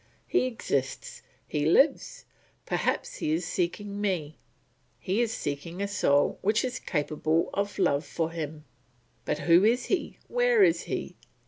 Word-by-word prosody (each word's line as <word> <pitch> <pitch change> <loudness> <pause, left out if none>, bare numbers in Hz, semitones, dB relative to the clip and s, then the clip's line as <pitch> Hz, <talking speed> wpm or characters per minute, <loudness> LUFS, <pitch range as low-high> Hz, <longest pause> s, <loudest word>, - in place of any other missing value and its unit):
He 360 - +2
exists, 140 - -3 0.3
he 150 - -1
lives, 285 - +2 0.4
perhaps - - -1
he 155 - -1
is 165 +2 -1
seeking 200 +4 -2
me; 170 -7 -1 0.6
he 195 +5 0
is 235 -2 0
seeking 165 0 -4
a 200 - -1
soul 145 -8 +2
which 215 +5 +2
is 255 0 -3
capable 155 +1 0
of 200 0 -2
love 150 -7 +2
for 160 +2 -3
him. 155 -2 -6 0.6
But - - 0
who 170 +2 +5
is 235 +4 +3
he, 370 - -2
where - - +4
is 330 -4 +3
he? - - -4
180 Hz, 145 wpm, -28 LUFS, 155-225 Hz, 0.6 s, who